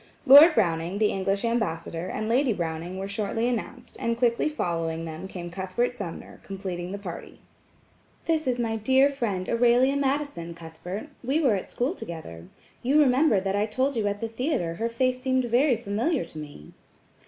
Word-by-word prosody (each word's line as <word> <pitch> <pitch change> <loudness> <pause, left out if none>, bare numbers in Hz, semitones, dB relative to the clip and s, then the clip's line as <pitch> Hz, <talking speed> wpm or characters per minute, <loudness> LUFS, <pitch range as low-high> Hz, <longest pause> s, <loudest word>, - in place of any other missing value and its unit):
Lord 295 +4 +9
Browning, 170 -2 +1
the 210 0 +2
English 195 +3 -1
Ambassador, 170 -7 -2
and 215 - -3
Lady 245 +1 +2
Browning 170 0 -4
were 195 +1 -4
shortly 215 +3 -1
announced, 240 -3 -4
and 230 0 -1
quickly 235 +3 +2
following 165 - -2
them 160 +3 -7
came 175 -2 -7
Cuthbert 190 +7 -2
Sumner, 185 -8 -7
completing 185 -2 -5
the 200 - -4
party. 190 -4 -8 0.9
"This 315 -3 0
is 250 -1 +1
my 225 -2 -1
dear 265 +6 +4
friend, 205 -9 -2
Aurelia 245 +3 +3
Madison, 275 - -2
Cuthbert; 170 - -8
we 270 +6 +1
were 270 -8 +3
at 195 - -3
school 255 +7 -1
together. 90 - -8 0.3
You 275 +5 +3
remember 265 -5 +4
that 195 +1 -1
I 205 +1 +1
told 260 +5 0
you 215 -3 0
at 205 0 -3
the 230 - -1
theatre 225 - -2
her 225 +7 -2
face 255 +2 0
seemed 260 -1 +1
very 245 +2 +3
familiar 230 - -1
to 160 -1 -10
me." 145 - -10
220 Hz, 175 wpm, -26 LUFS, 180-255 Hz, 0.9 s, Lord